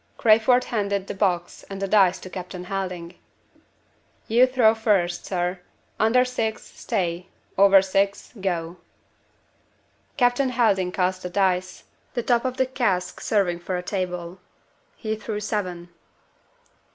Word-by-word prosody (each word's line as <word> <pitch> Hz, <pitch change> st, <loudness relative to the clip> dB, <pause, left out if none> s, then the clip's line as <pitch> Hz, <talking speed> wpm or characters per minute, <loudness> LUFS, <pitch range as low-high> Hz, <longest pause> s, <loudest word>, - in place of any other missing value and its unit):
Crayford 230 Hz, +3 st, +4 dB
handed 200 Hz, -4 st, -2 dB
the -, -, -5 dB
box 180 Hz, -3 st, -1 dB
and 195 Hz, -1 st, -6 dB
the 195 Hz, -, -2 dB
dice 190 Hz, -2 st, +4 dB
to 185 Hz, -, -9 dB
Captain 180 Hz, 0 st, -7 dB
Helding. 180 Hz, -2 st, -5 dB, 1.1 s
"You 240 Hz, +3 st, +5 dB
throw 250 Hz, -4 st, +4 dB
first, 200 Hz, -6 st, 0 dB
sir. 180 Hz, 0 st, -2 dB, 0.4 s
Under 235 Hz, +4 st, +4 dB
six, 225 Hz, -3 st, -2 dB
'Stay.' 175 Hz, 0 st, -3 dB, 0.3 s
Over 195 Hz, -1 st, +6 dB
six, 195 Hz, +1 st, -1 dB
'Go.'" 175 Hz, -2 st, -2 dB, 1.4 s
Captain 250 Hz, +1 st, +2 dB
Helding 210 Hz, -7 st, +2 dB
cast 185 Hz, 0 st, -1 dB
the 180 Hz, -, -5 dB
dice; 185 Hz, -1 st, 0 dB, 0.3 s
the 240 Hz, -, -1 dB
top 240 Hz, +1 st, +2 dB
of 255 Hz, 0 st, -2 dB
the 260 Hz, -, +3 dB
cask 195 Hz, -9 st, -1 dB
serving 185 Hz, -5 st, +1 dB
for 180 Hz, +1 st, -3 dB
a 180 Hz, -, -5 dB
table. 180 Hz, -2 st, -4 dB, 0.6 s
He 220 Hz, -1 st, -3 dB
threw 215 Hz, -1 st, -5 dB
seven. 185 Hz, -5 st, -4 dB
195 Hz, 130 wpm, -24 LUFS, 180-220 Hz, 1.4 s, Over